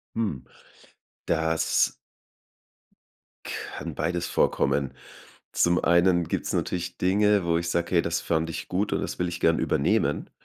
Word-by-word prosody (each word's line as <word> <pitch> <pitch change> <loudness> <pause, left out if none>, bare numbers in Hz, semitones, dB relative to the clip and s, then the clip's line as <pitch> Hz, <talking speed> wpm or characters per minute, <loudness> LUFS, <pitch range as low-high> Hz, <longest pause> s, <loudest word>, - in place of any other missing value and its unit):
Hm, 100 - -2 0.8
das 80 0 +1 1.5
kann - - -6
beides 85 +2 -1
vorkommen. 70 -2 +1 0.6
Zum 85 0 +2
einen 85 0 +4
gibt's - - -2
natürlich 90 -1 -2
Dinge, 100 +1 +3
wo 85 -1 +2
ich 85 0 -3
sage: 85 +1 0
„Hey, 85 - +5
das 85 0 -1
fand 80 0 0
ich - - -6
gut 100 +3 -1
und - - +1
das - - -5
will 90 0 0
ich 85 0 -5
gern 80 0 +3
übernehmen.“ - - 0
85 Hz, 140 wpm, -26 LUFS, 80-90 Hz, 1.5 s, Hey